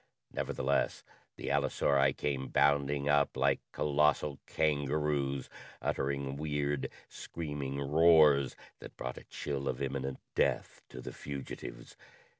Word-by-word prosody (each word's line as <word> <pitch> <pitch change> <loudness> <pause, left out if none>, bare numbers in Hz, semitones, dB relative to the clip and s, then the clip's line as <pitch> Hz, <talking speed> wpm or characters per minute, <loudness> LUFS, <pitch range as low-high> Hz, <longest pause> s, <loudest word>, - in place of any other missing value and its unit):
Nevertheless, 70 +2 0 0.3
the - - -5
allosauri 70 -1 +3
came 65 -2 -1
bounding 70 0 +2
up 75 -1 +3
like 70 0 +3
colossal 75 -1 +2
kangaroos, 70 -2 0 0.3
uttering 70 0 -1
weird, 75 -2 -1 0.2
screaming 75 -4 -5
roars 75 -1 +5 0.2
that - - -11
brought 60 0 -5
a - - -15
chill 70 -1 -4
of 60 - -1
imminent 70 -1 -2 0.2
death - - 0
to 65 - -8
the - - -7
fugitives. 70 -3 -7
70 Hz, 110 wpm, -32 LUFS, 70-75 Hz, 0.3 s, roars